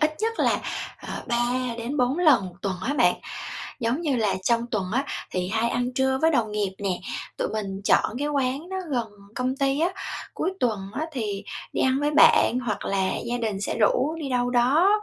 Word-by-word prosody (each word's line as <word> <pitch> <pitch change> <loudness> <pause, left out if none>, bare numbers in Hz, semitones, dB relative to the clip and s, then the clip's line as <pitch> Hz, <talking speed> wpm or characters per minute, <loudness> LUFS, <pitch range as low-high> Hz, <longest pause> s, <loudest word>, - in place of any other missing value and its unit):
ít 310 0 +2
nhất 450 +2 0
là, - - +3 0.5
ờ, - - -5
3-4 245 +3 0
lần 280 - +5
một 180 - -10
tuần 195 -2 -1
á 285 - 0
bạn. - - +4 0.7
Giống 235 +6 0
như 295 -6 +1
là 210 -5 +1
trong 235 +3 +2
tuần 205 -4 0
á 265 +4 +1 0.3
thì 180 -1 -1
hay 225 +3 +1
ăn 245 +1 -1
trưa 265 0 +2
với 320 - +5
đồng 220 -7 +1
nghiệp 205 -2 0
nè, 195 -3 -1 0.4
tụi - - -1
mình 195 -3 -4
chọn 230 +2 +3
cái 290 +1 -1
quán 280 +3 -1
đó 380 - -4 0.2
gần 240 -3 0 0.3
công 255 +1 -1
ty 275 +2 +1
á, 340 - +3 0.5
cuối 375 - -1
tuần 220 -5 +1
á 315 +2 -2
thì 210 -6 -3 0.3
đi - - 0
ăn 260 +1 +2
với 295 0 +1
bạn 255 -4 +6
hoặc 210 -3 -2
là 190 -1 +1 0.2
gia 240 +1 -1
đình 215 -4 -2
sẽ 205 - -2
rủ 265 +7 +3
đi 290 - -3
đâu 245 -1 +1
đó 255 +9 +4
245 Hz, 205 wpm, -25 LUFS, 215-275 Hz, 0.7 s, bạn